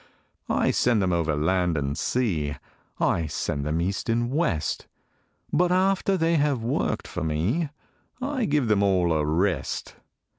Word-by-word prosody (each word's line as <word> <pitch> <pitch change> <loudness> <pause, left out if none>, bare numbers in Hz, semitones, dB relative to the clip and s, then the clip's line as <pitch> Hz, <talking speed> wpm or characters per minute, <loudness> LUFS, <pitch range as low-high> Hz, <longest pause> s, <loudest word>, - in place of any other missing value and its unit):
I - - +2
send 120 -3 +2
them 95 -2 +1
over 80 -3 +1
land 85 +2 +1
and 70 0 -1
sea, 80 - -1 0.4
I 85 -2 +1
send 70 -1 -2
them 80 +2 0
east 95 +6 -2
and 120 +1 +1
west; 90 - -1 0.7
But 180 0 +3
after 190 +1 +2
they 165 -1 +2
have 145 -5 +1
worked 115 - -1
for - - -4
me, 90 - 0 0.5
I 265 -2 -1
give 145 - +1
them 105 -2 +3
all 90 -4 +3
a 75 -1 +1
rest. 85 +4 -1
100 Hz, 150 wpm, -25 LUFS, -, 0.7 s, But